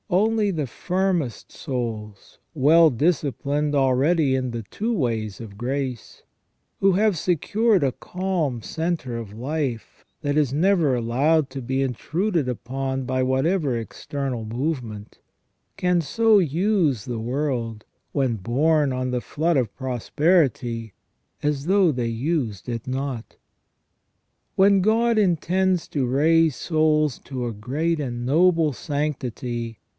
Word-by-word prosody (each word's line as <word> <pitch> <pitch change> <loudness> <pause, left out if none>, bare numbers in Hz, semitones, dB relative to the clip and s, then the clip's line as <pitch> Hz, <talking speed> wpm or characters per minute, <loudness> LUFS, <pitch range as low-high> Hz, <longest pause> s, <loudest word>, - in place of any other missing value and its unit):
Only 210 +3 +2
the 155 -6 -2
firmest 180 - -2
souls, 110 -6 -5
well 160 +3 +6
disciplined 145 0 0
already 135 +2 +3
in 130 -1 -1
the 115 -1 -5
two 215 - -3
ways 115 - -1
of 105 -3 -9
grace, 130 -1 -4 0.6
who 195 -1 +4
have 205 -1 +2
secured 200 +6 +2
a 135 - +2
calm 175 -10 -2
centre 160 -6 -3
of 115 -4 -7
life 130 +1 -4 0.2
that 145 -2 -1
is 145 -5 +2
never 160 -2 +3
allowed 135 +6 +2
to 135 0 -5
be 130 +2 -1
intruded 160 - -1
upon 130 +2 -3
by 130 +1 0
whatever 135 +1 +1
external 130 +1 -4
movement, 115 -3 -4 0.6
can 180 -2 +2
so 220 +6 +3
use 165 - +1
the 120 -3 -4
world, 120 -3 -2 0.3
when 130 -5 0
borne 140 - +1
on 130 0 -2
the 125 -1 -1
flood 160 +6 0
of 120 -7 0
prosperity, 130 - 0 0.5
as 145 0 -1
though 190 -3 +4
they 125 -4 -2
used 115 - -2
it 115 -2 -4
not. 130 -2 -4 1.2
When 195 0 +5
God 225 +3 +2
intends 185 -1 +1
to 135 -4 -1
raise 155 +3 +3
souls 155 -4 +1
to 130 -3 -5
a 120 - -3
great 150 +10 -1
and 120 -4 -4
noble 165 +1 +3
sanctity. 125 -5 -3
140 Hz, 125 wpm, -23 LUFS, 120-170 Hz, 1.2 s, well